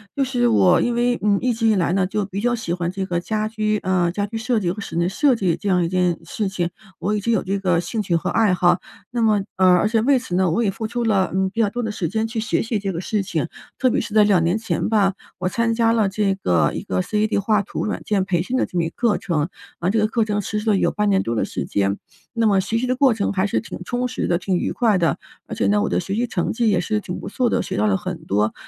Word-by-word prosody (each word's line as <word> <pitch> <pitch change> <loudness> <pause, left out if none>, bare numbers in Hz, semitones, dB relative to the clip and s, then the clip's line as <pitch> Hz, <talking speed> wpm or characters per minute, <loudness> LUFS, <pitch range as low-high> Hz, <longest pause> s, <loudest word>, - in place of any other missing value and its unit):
就 275 - +1
是 245 -2 +1
我 185 -6 +4
因 240 - 0
为， 240 0 +1
嗯， 205 -1 +3
一 250 -1 +1
直 225 0 0
以 220 - +4
来 175 -2 +1
呢 190 -1 +2
就 205 +1 -2
比 200 +1 -5
较 240 +1 +1
喜 175 -7 -3
欢 175 -1 -2
这 190 0 -3
个 175 -2 -1
家 215 +3 -2
居， 215 -1 -1
呃， 185 -2 +1
家 200 +3 -2
居 220 +3 -9
设 235 +1 0
计 175 -4 -1
和 205 - -6
室 - - -7
内 170 +1 +1
设 250 +8 +2
计 185 -6 0
这 200 +2 -4
样 180 -2 +3
一 - - -1
件 180 -1 +1
事 200 +4 -2
情， 175 -2 -2 0.3
我 205 +4 -1
已 210 - 0
经 235 - 0
有 225 - +1
这 195 +1 -2
个 180 -3 +1
兴 210 +6 -3
趣 180 -4 0
和 165 - -1
爱 220 -4 +3
好。 175 0 +3 0.3
那 240 -1 -1
么 215 -3 +3
呃， 185 0 +4
而 195 - +2
且 220 0 +1
为 270 +3 +4
此 245 -7 -6
呢， 185 0 +2
我 190 +9 +1
也 200 - +1
付 220 +3 -5
出 240 +1 -2
了， 200 -4 +1
嗯， 190 0 +1
比 230 - -1
较 210 - +2
多 245 +3 -4
的 220 - -2
时 175 -6 -3
间 220 +2 -1
去 225 0 -3
学 220 +1 0
习 225 -1 -1
这 195 -1 -2
个 170 - -4
事 205 +3 -1
情。 165 -6 -2 0.3
特 255 - +2
别 - - +1
是 215 - -6
在 215 - +7
2 195 -5 +3
年 175 +5 +1
前 220 0 -2
吧， 205 -3 +3 0.2
我 185 - -2
参 230 +3 0
加 230 0 +3
了 220 -4 +2
这 195 0 0
个 90 - +1
一 - - -4
个 90 -1 -1
CAD 210 0 0
画 205 +1 +2
图 200 - -4
软 210 - -3
件 200 -3 0
培 180 -3 0
训 245 +9 -2
的 - - +2
这 - - -13
么 170 -2 +1
一 - - -2
个 - - -26
课 230 -4 +1
程。 165 -6 -1 0.3
啊， 175 - 0
这 225 - +1
个 215 - +3
课 225 0 0
程 210 -1 -1
实 210 - -3
施 215 - -7
了 - - +3
有 - - +2
半 210 0 0
年 195 -1 +3
多 115 - -2
的 - - +1
时 - - -4
间， 100 0 0 0.4
那 230 -2 +2
么 200 -2 +4
学 200 +4 -1
习 250 +2 -1
的 255 - +1
过 265 -1 +4
程 210 -2 -1
还 190 -1 +1
是 205 - 0
挺 230 - -8
充 245 +1 -2
实 - - -3
的， 175 - +2
挺 185 +1 -1
愉 - - -1
快 225 -5 +2
的。 170 -2 +1 0.3
而 - - -6
且 - - 0
呢， 205 0 +3
我 - - 0
的 - - +1
学 195 +2 -3
习 235 +3 +1
成 185 -6 -1
绩 230 -1 +1
也 185 -4 +2
是 215 +4 -1
挺 180 -3 -6
不 - - -7
错 250 -2 0
的， - - +1
学 - - -4
到 - - +2
了 195 -2 +2
很 180 -3 -6
多 105 -1 +1
205 Hz, 330 characters per minute, -21 LUFS, 180-225 Hz, 0.4 s, 在